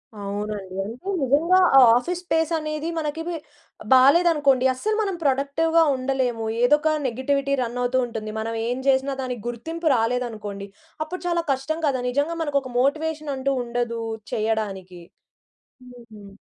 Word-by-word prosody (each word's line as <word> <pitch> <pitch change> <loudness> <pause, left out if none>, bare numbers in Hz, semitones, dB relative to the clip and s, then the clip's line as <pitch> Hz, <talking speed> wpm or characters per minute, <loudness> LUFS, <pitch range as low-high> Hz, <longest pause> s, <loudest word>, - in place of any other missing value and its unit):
అవునండి. 205 -1 -5
అంటే 230 - -9
నిజంగా, 300 +8 +3 0.2
ఆ - - +10 0.2
ఆఫీస్ 345 +9 -1
స్పేస్ 320 -1 0
అనేది 305 +1 -3
మనకిది 325 +3 -3 0.6
బాలేదనుకోండి 280 -1 +5
అస్సలు 425 +12 -2
మనం 395 -3 -1
ప్రొడక్టివ్‌గా 290 +4 +2
ఉండలేము. 255 -3 -1 0.2
ఏదో 245 +5 +5
ఒక 310 +1 +1
నెగెటివిటీ 275 +3 -1
రన్ 240 0 -3
అవుతూ 245 +1 +1
ఉంటుంది. 225 -2 -6
మనం 225 +1 -3
ఏం 245 +1 -1
చేసినా 270 0 +2
దానికి 250 -3 -4
గుర్తింపు 320 +8 -4
రాలేదనుకోండి. 225 -4 -2 0.4
అప్పుడు 355 +4 -7
చాలా 340 -1 0
కష్టం 275 +4 -2
కదా, 260 -3 0
నిజంగా 290 +6 -1
మనకు 290 -2 +1
ఒక 260 -1 -9
మోటివేషన్ 305 +1 -1
అంటూ 270 +1 -1
ఉండదు 235 -1 -2 0.3
చేయడానికి. 200 -5 -2 0.9
హుహు. 220 -4 -14
265 Hz, 135 wpm, -23 LUFS, 235-310 Hz, 0.9 s, ఆ